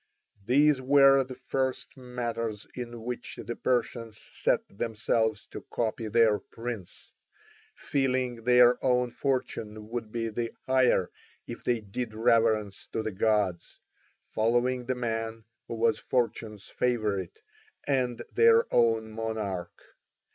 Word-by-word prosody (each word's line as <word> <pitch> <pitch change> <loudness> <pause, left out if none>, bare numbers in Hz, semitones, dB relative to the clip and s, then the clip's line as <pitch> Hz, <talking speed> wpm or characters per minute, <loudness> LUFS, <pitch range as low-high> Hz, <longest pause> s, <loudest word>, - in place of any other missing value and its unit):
These 140 +4 +4
were 135 0 +6
the 130 0 -9
first 130 0 -3
matters 115 -4 -4
in 120 -2 -7
which 125 +1 -5
the 120 - -4
Persians 115 -3 -1
set - - 0
themselves 110 0 -1
to - - -7
copy 115 -1 -2
their 110 -1 +4
prince; 115 -3 -8 0.6
feeling 130 -4 -1
their 125 0 +5
own 125 -1 +2
fortune 110 -6 -3
would 115 -2 -5
be 115 0 -2
the 115 +1 -3
higher 130 -8 +3 0.3
if 120 - -8
they 120 -2 0
did 110 +2 -5
reverence 110 -3 +2
to 110 - -1
the 110 - -2
gods, 100 -3 0 0.5
following 120 +3 +1
the 130 - 0
man 115 -2 -3 0.2
who - - -4
was 115 -1 +2
fortune's 110 -4 -2
favourite 110 - -1 0.5
and 130 -4 0
their 460 0 +6
own 115 -2 +3
monarch. 110 -6 -4
115 Hz, 120 wpm, -28 LUFS, 110-125 Hz, 0.6 s, were